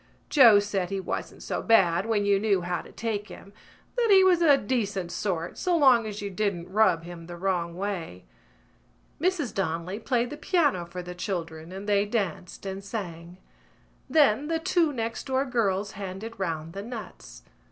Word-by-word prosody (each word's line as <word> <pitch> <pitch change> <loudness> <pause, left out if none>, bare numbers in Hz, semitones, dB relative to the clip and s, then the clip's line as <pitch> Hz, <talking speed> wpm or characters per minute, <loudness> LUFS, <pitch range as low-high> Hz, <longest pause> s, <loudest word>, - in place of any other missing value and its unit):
Joe 235 -8 +8
said 205 -3 -1
he 195 0 -2
wasn't 190 - -5
so - - -3
bad 190 -4 +3
when 210 -3 +1
you 200 -1 +3
knew 200 -3 +2
how 175 0 -2
to - - -14
take 215 -2 -3
him, 200 -2 -12 0.4
that 480 -2 +1
he 385 -2 +7
was 360 -2 +4
a 295 -4 +6
decent 205 -7 -2
sort 175 -2 -3
so 355 -2 +1
long 255 -7 +5
as 205 -1 -6
you 200 - -4
didn't 185 -3 -2
rub 190 -6 +3
him 170 -1 -9
the 175 0 -8
wrong 175 -2 -1
way. 180 - -4 1.0
Mrs 330 - 0
Donnelly 180 +1 -2
played 245 +1 0
the 295 - -6
piano 295 - +1
for 180 +1 -7
the 180 0 -7
children 170 -3 -5
and 195 +2 -7
they 205 0 +3
danced 200 -5 -3
and 195 0 -5
sang. 175 -4 -6 0.7
Then 290 -3 +4
the 325 0 0
two 330 -1 +2
next 230 -2 -4
door 265 +1 +1
girls 205 -5 0
handed 195 +3 -7
round 165 -3 -3
the 200 - -5
nuts. 225 0 -9
200 Hz, 175 wpm, -27 LUFS, 180-235 Hz, 1.0 s, Joe